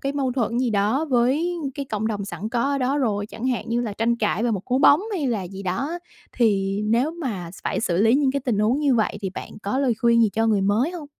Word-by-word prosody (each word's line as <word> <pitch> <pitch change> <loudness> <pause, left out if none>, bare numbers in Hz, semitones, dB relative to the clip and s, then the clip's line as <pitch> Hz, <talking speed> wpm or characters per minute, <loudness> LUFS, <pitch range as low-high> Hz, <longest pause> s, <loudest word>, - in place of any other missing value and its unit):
cái 275 0 -2
mâu 270 -3 -1
thuẫn 240 -2 -1
gì 250 -2 +1
đó 215 +8 +1
với 275 +9 +2 0.2
cái 280 - -4
cộng 220 -3 -3
đồng 205 -3 -2
sẵn 205 +2 -5
có 235 0 -1
ở 280 0 0
đó 270 +2 0
rồi, 205 -6 0
chẳng 225 +3 -6
hạn 250 -2 -1
như 235 +1 0
là 220 -4 -3
tranh 230 +3 0
cãi 215 -1 0
về 240 - +1
một 195 -4 -2
cú 255 +1 0
bóng 285 +3 +6
hay 320 -8 -1
là 225 -6 -1
gì 190 +2 -8
đó. 270 - -2 0.3
Thì 200 -4 +1
nếu 235 +8 +2
mà 230 - -5
phải - - -1
xử 175 -7 0
lý 225 +2 +5
những 275 -1 +3
cái 280 - -1
tình 230 -5 0
huống 235 +7 +2
như 280 -4 +3
vậy, 215 -2 0
thì 190 -2 -3
bạn - - -8
có 205 +6 -1
lời 260 -4 +2
khuyên 235 -1 +4
gì 220 - +4
cho 225 +1 +1
người 210 -3 +2
mới 210 - +1
hông? 340 -5 -7
235 Hz, 270 wpm, -23 LUFS, 210-270 Hz, 0.3 s, bóng